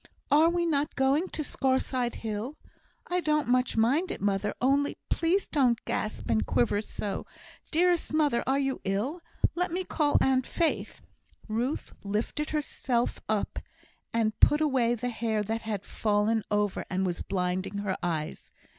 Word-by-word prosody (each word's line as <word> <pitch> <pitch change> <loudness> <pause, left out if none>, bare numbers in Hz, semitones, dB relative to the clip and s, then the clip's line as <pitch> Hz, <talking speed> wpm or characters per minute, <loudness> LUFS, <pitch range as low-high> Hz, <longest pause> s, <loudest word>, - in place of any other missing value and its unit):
Are 310 +3 +6
we 345 0 +1
not 295 -3 0
going 275 +6 +2
to 305 - -3
Scaurside 260 -3 0
hill? 220 +7 -3 0.5
I 360 0 0
don't 305 -5 +1
much 250 -1 +2
mind 275 +12 +3
it, - - -4
mother; 200 +1 0
only 275 +3 +2
please 350 +4 +2
don't 255 -6 +3
gasp 215 - -3
and 110 -1 +2
quiver 125 - +1
so. 205 -1 -4 0.4
Dearest 350 +1 +2
mother, 295 -5 +2
are 265 +1 +3
you 270 -1 -1
ill? 220 - -1 0.3
Let 360 0 -1
me 365 +2 0
call 300 -4 +2
Aunt 260 -1 +2
Faith!" 335 -2 -1 0.4
Ruth 235 +6 -2
lifted 215 +9 -2
herself 265 -5 -1
up, 215 -2 -1 0.5
and 220 -2 0
put 295 - +6
away 260 -6 +2
the 245 +2 -3
hair 220 -2 -1
that 225 +2 -2
had 210 -3 -4
fallen 215 +1 +1
over 210 -1 0
and 190 0 0
was 175 -2 -2
blinding 185 +1 -1
her 200 -2 -1
eyes. 160 -3 -3
245 Hz, 155 wpm, -28 LUFS, 210-300 Hz, 0.5 s, Are